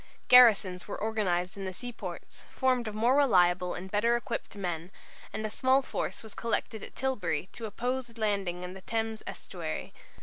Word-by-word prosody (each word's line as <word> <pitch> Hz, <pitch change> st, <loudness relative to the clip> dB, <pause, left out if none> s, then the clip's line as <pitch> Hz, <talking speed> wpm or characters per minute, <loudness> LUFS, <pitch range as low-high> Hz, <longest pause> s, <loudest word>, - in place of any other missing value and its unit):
Garrisons 210 Hz, -7 st, +7 dB
were -, -, -4 dB
organized 195 Hz, -5 st, 0 dB
in 195 Hz, -, -4 dB
the 185 Hz, -1 st, -5 dB
seaports, 245 Hz, -1 st, -7 dB
formed 255 Hz, -3 st, +1 dB
of 215 Hz, -, -4 dB
more 235 Hz, +5 st, +3 dB
reliable 180 Hz, -9 st, +4 dB
and 185 Hz, +2 st, -7 dB
better 230 Hz, +3 st, +3 dB
equipped 235 Hz, -2 st, -4 dB
men, 175 Hz, -3 st, -3 dB, 0.4 s
and 215 Hz, -, -3 dB
a -, -, -1 dB
small 260 Hz, +4 st, +3 dB
force -, -, -3 dB
was 220 Hz, -, -9 dB
collected 225 Hz, -1 st, -2 dB
at -, -, -9 dB
Tilbury 205 Hz, -, -1 dB
to 230 Hz, -2 st, -5 dB
oppose 245 Hz, +4 st, -2 dB
a 230 Hz, 0 st, -14 dB
landing 195 Hz, -5 st, -1 dB
in 180 Hz, 0 st, -6 dB
the 190 Hz, -, -10 dB
Thames 225 Hz, +1 st, -2 dB
estuary. -, -, -5 dB
215 Hz, 175 wpm, -30 LUFS, 185-240 Hz, 0.4 s, Garrisons